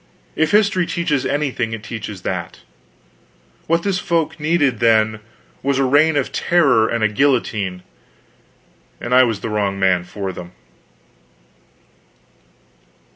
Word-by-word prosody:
If 160 0 +1
history 200 -3 +2
teaches 150 -6 -1
anything, 130 -6 -2
it 110 -1 -6
teaches 105 -4 -7
that. 85 -2 -5 1.1
What 165 +1 +1
this 195 -2 0
folk 170 -2 -1
needed, 145 -6 +1
then, 110 -2 +3 0.4
was 140 -1 0
a 135 - +2
Reign 145 +4 +3
of 140 - -1
Terror 135 -11 +2
and 115 -1 -1
a - - +5
guillotine, 110 -6 0 1.2
and 120 - -3
I 130 - +7
was 115 -5 0
the - - -4
wrong 100 -2 -1
man 95 -2 +2
for 95 +1 -5
them. 90 0 -10
125 Hz, 130 wpm, -19 LUFS, 105-150 Hz, 1.2 s, I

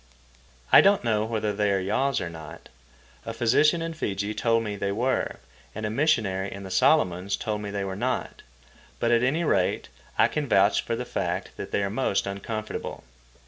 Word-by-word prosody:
I - - +10
don't 200 0 +4
know 110 -2 +1
whether 110 -2 -1
they 105 0 +1
are 100 - +2
yaws 120 +8 0
or 90 - -3
not—a 65 - -12
physician 150 +9 +3
in 165 0 -4
Fiji 100 -8 -3
told 115 0 +1
me 105 -2 -4
they 100 0 -2
were, 125 +6 0 0.4
and 110 0 -4
a 105 - -2
missionary 110 -8 +1
in 100 0 -7
the 95 - -8
Solomons 100 - +2
told 105 -1 -3
me 105 - -5
they 100 0 -3
were 95 -1 -4
not; 125 +6 -3 0.6
but 120 - +1
at 120 0 +4
any 140 +7 +1
rate 95 - +1 0.3
I - - +5
can 150 -2 -3
vouch 100 0 +4
for 115 - -3
the 125 - -4
fact 90 -3 -3
that - - -6
they 100 - 0
are 100 - -2
most 110 -3 0
uncomfortable. 105 +2 -5
105 Hz, 185 wpm, -26 LUFS, 95-120 Hz, 0.6 s, I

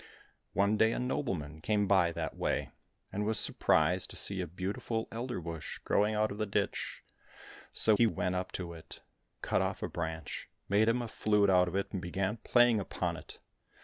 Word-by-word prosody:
One 100 +3 +2
day 110 +1 +4
a - - -2
nobleman 90 - -3
came 105 +3 +1
by 95 -4 +3
that - - -4
way, - - -1 0.4
and 105 - -1
was 110 +1 +2
surprised - - +3
to - - -5
see 95 -2 +3
a 90 - -3
beautiful 95 +6 -3
elder 120 -1 -4
bush 85 -2 -6
growing 105 +1 +2
out 110 0 +1
of 100 - -7
the 110 - -1
ditch; 100 0 -2 0.7
so 110 - +5
he 115 +2 +4
went 90 -4 -1
up 90 0 -3
to 85 -2 -5
it, 80 -1 -11 0.4
cut - - +1
off - - -2
a - - 0
branch, 80 -2 -5 0.2
made 105 +3 +3
him 120 +1 +1
a - - -4
flute 105 -2 +2
out 90 -1 +5
of 90 - -4
it, 100 - -2
and 95 - -2
began 95 +4 -2
playing 120 0 +4
upon 100 - -2
it. - - -10
100 Hz, 190 wpm, -32 LUFS, 90-110 Hz, 0.7 s, so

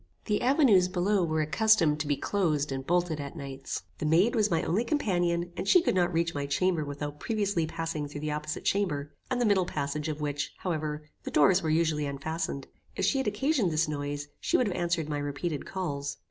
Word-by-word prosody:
The 210 - 0
avenues 245 - +5
below 185 +2 +1
were 155 -2 +1
accustomed 165 -3 +3
to 150 - -2
be 145 -1 +1
closed 155 -8 0
and 135 0 -3
bolted 175 -2 +1
at 140 -1 -6
nights. 135 -1 -5 0.2
The 155 - -1
maid 175 +9 +4
was 215 -3 +2
my 165 - +1
only 185 +8 +1
companion, 175 - 0
and 190 - -4
she 360 - +7
could 345 - +1
not 180 -1 +2
reach 170 0 0
my 140 -1 -3
chamber 160 +3 +1
without 145 0 -5
previously 200 -7 0
passing 160 -2 -3
through 145 0 -7
the 155 0 -2
opposite 150 +1 -4
chamber, 150 -8 0 0.2
and 255 -1 0
the 245 - +2
middle 195 -4 +3
passage, 145 0 -2
of 155 0 -4
which, 145 -1 -3
however, 155 -4 -3 0.2
the - - -6
doors 180 +5 +4
were 160 - -1
usually 155 -2 +1
unfastened. 140 0 -3 0.3
If - - 0
she 275 - +2
had 265 - -1
occasioned 240 - +1
this 155 0 +1
noise, 145 -1 -3
she 350 - +2
would 250 - +2
have 200 - -2
answered 170 -3 0
my 150 -1 -2
repeated 145 +2 -3
calls. 145 -7 -3
165 Hz, 210 wpm, -29 LUFS, 145-190 Hz, 0.3 s, she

